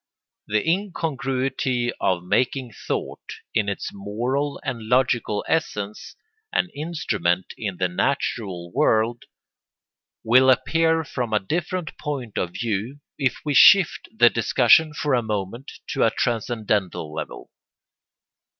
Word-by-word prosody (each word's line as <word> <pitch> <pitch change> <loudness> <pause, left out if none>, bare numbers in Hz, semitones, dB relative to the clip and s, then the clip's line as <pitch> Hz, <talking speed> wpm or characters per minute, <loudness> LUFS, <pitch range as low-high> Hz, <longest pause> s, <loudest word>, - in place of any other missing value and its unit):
] - - -65
The 105 +4 0
incongruity 135 -9 -1
of 90 -2 +1
making 125 +6 0 0.2
thought, - - -3 0.3
in 105 -1 +1
its 100 - -4
moral 120 +9 -2
and 115 -5 -4
logical 125 -4 +1
essence, 105 -10 -2 0.4
an 180 - +1
instrument 105 - -1
in 100 -5 -4
the 90 - +1
natural 90 -4 -2
world 115 +2 +1 1.0
will 130 +3 +5
appear 160 +4 +3
from 125 -6 -4
a 105 - +4
different 170 - -3
point 130 -7 -4
of 90 -1 -2
view 115 +4 -2 0.2
if 130 -3 +1
we 150 - 0
shift 190 +4 +6
the 165 - +5
discussion 125 +6 +4
for 150 -1 -1
a 125 - +3
moment 110 +3 -4 0.2
to - - +1
a - - +5
transcendental 105 -8 -1
level. - - -7
120 Hz, 125 wpm, -23 LUFS, 105-140 Hz, 1.0 s, shift